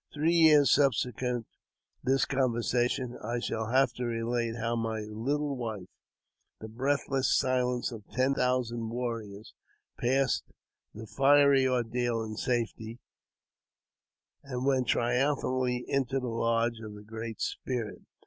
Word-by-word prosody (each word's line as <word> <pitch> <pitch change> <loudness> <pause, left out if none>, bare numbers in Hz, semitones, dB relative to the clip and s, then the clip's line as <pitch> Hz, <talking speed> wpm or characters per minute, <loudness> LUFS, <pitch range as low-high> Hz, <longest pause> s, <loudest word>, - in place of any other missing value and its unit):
Three 155 +3 +1
years 155 -4 +6
subsequent 125 -3 +1 0.6
this 135 +1 +2
conversation, 125 -1 0
I 120 +3 -2
shall 110 -2 -3
have 130 +4 +3
to 125 - -3
relate 115 0 -1
how 115 0 -1
my 110 -1 -2
little 135 +7 -2
wife, 110 -7 -5 0.7
the 110 - -7
breathless 135 +3 0
silence 125 -2 0
of 110 -3 -8
ten 130 +2 +2
thousand 120 -3 0
warriors, 115 -3 -5 0.5
passed 135 +2 +1 0.5
tM 110 +1 -8
fiery 140 +1 +5
ordeal 120 -2 0
in 110 -1 -6
safety, 115 -1 -2 1.4
and 130 -2 -4
went 130 -2 +2
triumphantly 125 0 +1
into 135 0 0
the 125 -2 -4
lodge 115 0 0
of 105 -1 -8
the 105 - -11
Great 110 +1 -7
Spirit. 120 -5 -3
120 Hz, 120 wpm, -29 LUFS, 115-130 Hz, 1.4 s, years